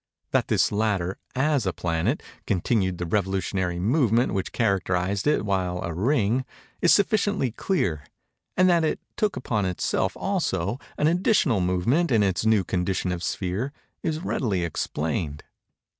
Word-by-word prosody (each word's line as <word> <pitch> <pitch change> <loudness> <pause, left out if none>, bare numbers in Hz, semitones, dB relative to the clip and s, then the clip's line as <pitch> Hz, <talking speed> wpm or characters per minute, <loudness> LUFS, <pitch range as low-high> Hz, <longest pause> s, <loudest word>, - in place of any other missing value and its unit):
That - - +2
this - - +2
latter, 100 -4 0 0.2
as 135 -4 +1
a 95 - 0
planet, 85 - -1 0.2
continued 95 -1 +1
the 90 - -3
revolutionary 95 -1 -1
movement 120 - +2
which 95 -1 -2
characterized 95 -1 0
it 150 -7 +2
while 90 -3 0
a 85 - -3
ring, 115 - +1 0.4
is 175 - +5
sufficiently 200 - +2
clear; 95 - -1 0.5
and 185 0 +5
that 170 -2 +4
it 155 - 0 0.2
took 210 -2 0
upon 105 -5 -1
itself 90 - -1
also, 120 - -1 0.2
an - - +1
additional 165 - +3
movement 90 - +1
in 110 -3 +4
its 95 +2 0
new 110 -3 +4
condition 90 +1 -1
of 90 -1 -3
sphere, 100 +11 -2 0.3
is 160 -1 -2
readily 100 - 0
explained. 75 -2 -2
100 Hz, 145 wpm, -25 LUFS, 90-135 Hz, 0.5 s, is